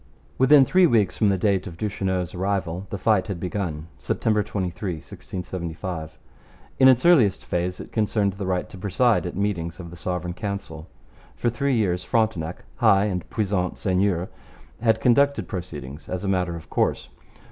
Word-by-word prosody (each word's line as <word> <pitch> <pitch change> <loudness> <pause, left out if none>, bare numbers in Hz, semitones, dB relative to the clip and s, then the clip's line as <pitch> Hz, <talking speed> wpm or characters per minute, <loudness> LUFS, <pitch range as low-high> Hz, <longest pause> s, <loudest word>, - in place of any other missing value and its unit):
Within 135 +1 +7
three 185 +4 +5
weeks 110 - +2
from 105 - +3
the 95 - +2
date 95 0 +1
of 85 -3 -9
Duchesneau's 95 -3 -2
arrival 95 -1 -2
the 100 - -4
fight 105 -1 +2
had 100 -5 -4
begun 90 -4 -3
(September 110 -1 +1
23, 95 -2 -3
1675). 85 0 -6 0.6
In 130 - +8
its 130 +1 +5
earliest 125 - +4
phase 90 0 -2
it - - -9
concerned 105 -2 +1
the 95 0 -5
right 90 -1 -1
to 95 - -10
preside 105 +2 +2
at - - -6
meetings 90 -4 -2
of 85 -2 -8
the - - -9
Sovereign 90 0 -3
Council. 90 -5 -5 0.5
For 120 - 0
three 140 +2 0
years 90 -5 +1
Frontenac, 95 -8 -1
'high 100 +1 +4
and 90 -4 -3
puissant 95 -4 -1
seigneur,' 95 -2 0 0.5
had 110 -1 +2
conducted 125 -4 +3
proceedings 75 -5 -7
as 90 0 -3
a - - -2
matter 90 -3 0
of 85 - -9
course. - - 0
95 Hz, 165 wpm, -24 LUFS, 90-105 Hz, 0.6 s, In